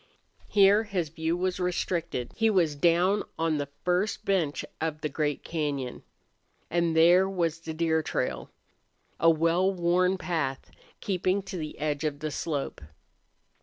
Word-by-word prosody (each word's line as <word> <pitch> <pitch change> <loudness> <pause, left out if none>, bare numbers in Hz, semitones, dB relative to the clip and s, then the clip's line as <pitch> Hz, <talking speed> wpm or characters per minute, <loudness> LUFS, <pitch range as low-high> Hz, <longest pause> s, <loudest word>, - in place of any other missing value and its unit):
Here 205 +2 +5
his 185 -6 -2
view 160 +2 -2
was 185 +1 -1
restricted. 175 -6 -2
He 225 -1 +3
was 170 -8 +2
down 175 +6 +3 0.2
on 160 -2 0
the 140 -1 -3 0.2
first 180 +4 0
bench 175 -7 0 0.2
of 160 -1 -2
the 155 - -1
great 145 +1 -2
cañon. 145 -6 -3 0.7
And 170 -1 +1
there 175 +4 +6
was 170 -4 -1
the 165 -1 -6
deer 160 -1 +1
trail, 60 - -3 0.7
a 165 - +5
well 165 +4 +3
worn 180 +1 +2
path 160 -8 -3 0.3
keeping 190 -1 0
to 190 - -7
the 155 -2 -6
edge 150 -1 -2
of 150 -2 -1
the 155 +1 -4
slope. 145 - -3
165 Hz, 145 wpm, -28 LUFS, 155-185 Hz, 0.7 s, there